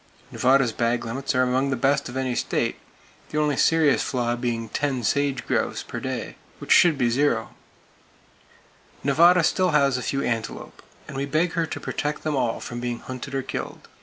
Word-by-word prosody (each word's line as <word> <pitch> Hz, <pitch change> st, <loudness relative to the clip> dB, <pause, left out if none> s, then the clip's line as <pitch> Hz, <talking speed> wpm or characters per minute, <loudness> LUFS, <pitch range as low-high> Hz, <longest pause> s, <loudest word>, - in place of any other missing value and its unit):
Nevada's 130 Hz, -1 st, +3 dB
bag 120 Hz, +1 st, -1 dB
limits 130 Hz, +4 st, -3 dB
are 130 Hz, -, +4 dB
among 130 Hz, +2 st, +1 dB
the 135 Hz, -, 0 dB
best 135 Hz, +2 st, +1 dB
of 125 Hz, -, -6 dB
any 130 Hz, -1 st, -1 dB
state, -, -, -1 dB, 0.5 s
the 150 Hz, -, -4 dB
only 150 Hz, -1 st, +2 dB
serious 155 Hz, -1 st, +3 dB
flaw 120 Hz, -2 st, -1 dB
being 120 Hz, -2 st, -2 dB
"10 135 Hz, -2 st, -2 dB
sage 140 Hz, +2 st, 0 dB
grouse" -, -, -1 dB
per -, -, -6 dB
day: -, -, -5 dB, 0.2 s
which -, -, -7 dB
should 170 Hz, -4 st, +6 dB
be 120 Hz, -3 st, +1 dB
0! 120 Hz, -3 st, +1 dB, 1.5 s
Nevada 170 Hz, +5 st, +5 dB
still 185 Hz, +3 st, +2 dB
has 140 Hz, -4 st, +3 dB
a -, -, -5 dB
few 140 Hz, +2 st, -2 dB
antelope; 115 Hz, -3 st, -4 dB, 0.3 s
and -, -, -8 dB
we 135 Hz, +1 st, -1 dB
beg 160 Hz, +4 st, +1 dB
her 165 Hz, -1 st, -1 dB
to -, -, -5 dB
protect 150 Hz, 0 st, -3 dB
them 155 Hz, -2 st, -1 dB
all 120 Hz, -4 st, 0 dB
from 120 Hz, -, -6 dB
being 120 Hz, -1 st, -3 dB
hunted 130 Hz, +2 st, -7 dB
or 135 Hz, -, -1 dB
killed! -, -, -6 dB
135 Hz, 185 wpm, -24 LUFS, 120-145 Hz, 1.5 s, should